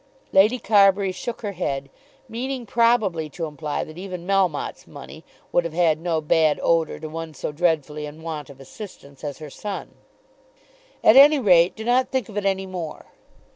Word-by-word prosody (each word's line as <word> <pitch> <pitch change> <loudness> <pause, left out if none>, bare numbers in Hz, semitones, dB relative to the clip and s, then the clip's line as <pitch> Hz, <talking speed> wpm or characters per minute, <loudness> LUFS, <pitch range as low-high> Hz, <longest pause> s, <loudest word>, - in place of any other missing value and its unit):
Lady 210 +6 +5
Carbury 200 -3 +4
shook 230 +6 -6
her 205 - -2
head, 140 -7 -3 0.4
meaning 250 +2 -4
probably 220 -9 +2
to 165 +3 -5
imply 150 -1 -4
that 155 +2 -10
even 180 -2 -7
Melmotte's 190 -6 0
money - - -11 0.3
would 175 - +2
have 165 -1 -6
had 165 -3 +2
no 165 -2 0
bad 155 0 +2
odour 165 -2 +1
to 155 - -7
one 160 0 -7
so 135 - -4
dreadfully 150 -2 -1
in 155 +2 -11
want 155 -4 -6
of 135 -1 -13
assistance 140 -2 -12
as 145 -2 -5
her 155 -2 -10
son. 205 +4 -6 1.1
"At 220 - +7
any 295 +2 +8
rate 180 -8 +4
do 220 - -7
not 245 +3 +2
think 260 -5 -2
of 210 - -11
it 205 - -2
any 195 -1 0
more." 180 -4 -7
175 Hz, 175 wpm, -23 LUFS, 155-205 Hz, 1.1 s, any